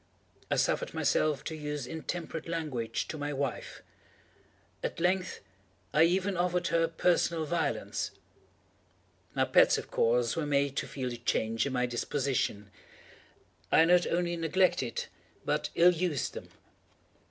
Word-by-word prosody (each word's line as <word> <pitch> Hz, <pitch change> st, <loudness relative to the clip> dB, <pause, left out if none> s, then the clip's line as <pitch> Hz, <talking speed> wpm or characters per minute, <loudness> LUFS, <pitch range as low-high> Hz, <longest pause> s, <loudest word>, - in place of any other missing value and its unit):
I -, -, +2 dB
suffered -, -, 0 dB
myself 150 Hz, -2 st, +1 dB
to 160 Hz, -, -4 dB
use 150 Hz, -3 st, -4 dB
intemperate 160 Hz, +2 st, -5 dB
language 145 Hz, -9 st, -2 dB
to 155 Hz, -, -5 dB
my 145 Hz, 0 st, -2 dB
wife. 140 Hz, -2 st, -4 dB, 1.0 s
At -, -, -3 dB
length, 180 Hz, +2 st, 0 dB, 0.5 s
I 155 Hz, +2 st, +6 dB
even 185 Hz, +3 st, +1 dB
offered 180 Hz, 0 st, 0 dB
her 165 Hz, 0 st, +2 dB
personal 165 Hz, -1 st, +1 dB
violence. 160 Hz, -2 st, -1 dB, 1.3 s
My -, -, +3 dB
pets, -, -, +5 dB
of -, -, -7 dB
course, 120 Hz, 0 st, +2 dB
were 160 Hz, -3 st, -1 dB
made 140 Hz, -1 st, +1 dB
to -, -, -1 dB
feel 130 Hz, -2 st, -4 dB
the 120 Hz, -, -5 dB
change 115 Hz, 0 st, 0 dB
in 135 Hz, -, -4 dB
my 125 Hz, -1 st, +1 dB
disposition. 120 Hz, -5 st, -1 dB, 1.0 s
I 160 Hz, -, +6 dB
not 175 Hz, +1 st, +4 dB
only 175 Hz, 0 st, 0 dB
neglected, 165 Hz, -7 st, +1 dB, 0.4 s
but -, -, 0 dB
ill 175 Hz, +1 st, +6 dB
used 170 Hz, -4 st, -1 dB
them. -, -, -8 dB
155 Hz, 135 wpm, -30 LUFS, 135-170 Hz, 1.3 s, I